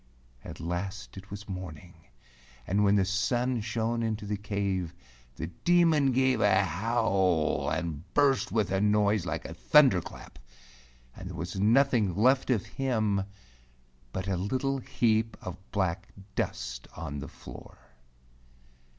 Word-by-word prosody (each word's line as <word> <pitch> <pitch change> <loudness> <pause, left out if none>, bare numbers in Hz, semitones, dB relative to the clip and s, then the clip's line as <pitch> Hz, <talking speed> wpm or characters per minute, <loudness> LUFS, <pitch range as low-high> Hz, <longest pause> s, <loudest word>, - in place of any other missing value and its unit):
At - - -9
last 95 +4 -4
it 95 +1 -11
was 100 +1 -8
morning, 90 -2 -7 0.7
and 100 +6 +1
when 100 0 +4
the 100 -2 +3
sun 120 +5 0
shone 115 +1 -1
into 110 -2 -2
the 105 +1 -2
cave, 100 -4 -2 0.4
the 80 - -4
Demon 155 - +3
gave 130 -2 +2
a 100 -1 +4
howl 95 -3 +1
and 80 0 -4
burst 140 -3 +3
with 110 -4 0
a 95 0 +1
noise 105 -2 +2
like 80 0 -3
a 80 - -6
thunder 130 - +5
clap, 70 - -12 0.8
and 90 - -8
there 90 - -7
was 85 +4 -4
nothing 115 -3 +3
left 130 +7 +3
of 115 -7 +1
him 110 -7 0 0.9
but 95 +5 -4
a 95 -2 0
little 130 +8 -1
heap 115 -4 0
of 90 - -6 0.2
black 95 -1 -1 0.3
dust 60 -6 -3
on 75 -3 -5
the 70 - -6
floor. - - -12
100 Hz, 140 wpm, -29 LUFS, 90-115 Hz, 0.9 s, thunder